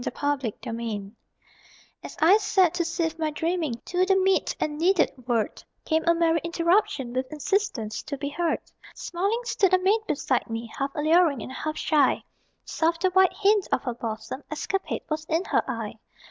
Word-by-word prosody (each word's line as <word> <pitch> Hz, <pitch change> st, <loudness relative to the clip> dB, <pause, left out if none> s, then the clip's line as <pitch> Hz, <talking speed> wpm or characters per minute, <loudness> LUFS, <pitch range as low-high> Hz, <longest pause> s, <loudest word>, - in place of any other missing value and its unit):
THE -, -, -1 dB, 0.5 s
INTRUDER 225 Hz, -4 st, -4 dB, 0.9 s
As -, -, -9 dB
I 355 Hz, +6 st, +6 dB
sat, 380 Hz, -5 st, +3 dB
to 350 Hz, -1 st, 0 dB
sift 330 Hz, -1 st, -2 dB
my 315 Hz, -1 st, 0 dB
dreaming 320 Hz, -3 st, -1 dB
To 360 Hz, +1 st, +1 dB
the 385 Hz, +1 st, +3 dB
meet 380 Hz, 0 st, +2 dB
and 300 Hz, 0 st, -2 dB
needed 355 Hz, 0 st, +3 dB, 0.2 s
word, 230 Hz, -4 st, -1 dB, 0.2 s
Came 320 Hz, 0 st, +1 dB
a 335 Hz, -, +5 dB
merry 330 Hz, -1 st, +2 dB
Interruption 335 Hz, -, +1 dB
With 255 Hz, +2 st, -2 dB
insistence 295 Hz, -, -1 dB
to 285 Hz, -2 st, -6 dB
be 285 Hz, +1 st, -3 dB
heard. 335 Hz, +2 st, 0 dB, 0.4 s
Smiling 400 Hz, +7 st, -1 dB
stood 385 Hz, -5 st, +3 dB
a -, -, +4 dB
maid 385 Hz, +4 st, +2 dB
beside 270 Hz, -7 st, 0 dB
me, 225 Hz, 0 st, -5 dB
Half 275 Hz, 0 st, -3 dB
alluring 310 Hz, -4 st, +3 dB
and -, -, -8 dB
half 310 Hz, +3 st, -4 dB
shy; 295 Hz, -4 st, +2 dB, 0.4 s
Soft 330 Hz, +1 st, 0 dB
the 370 Hz, -, +3 dB
white 375 Hz, 0 st, +4 dB
hint 415 Hz, -1 st, +2 dB
of -, -, +1 dB
her 245 Hz, -, -2 dB
bosom 225 Hz, +2 st, -5 dB
Escapade 380 Hz, +5 st, -3 dB
was 310 Hz, -1 st, -2 dB
in 325 Hz, +4 st, 0 dB
her -, -, +2 dB
eye. 225 Hz, -3 st, -4 dB
320 Hz, 175 wpm, -26 LUFS, 265-370 Hz, 0.9 s, I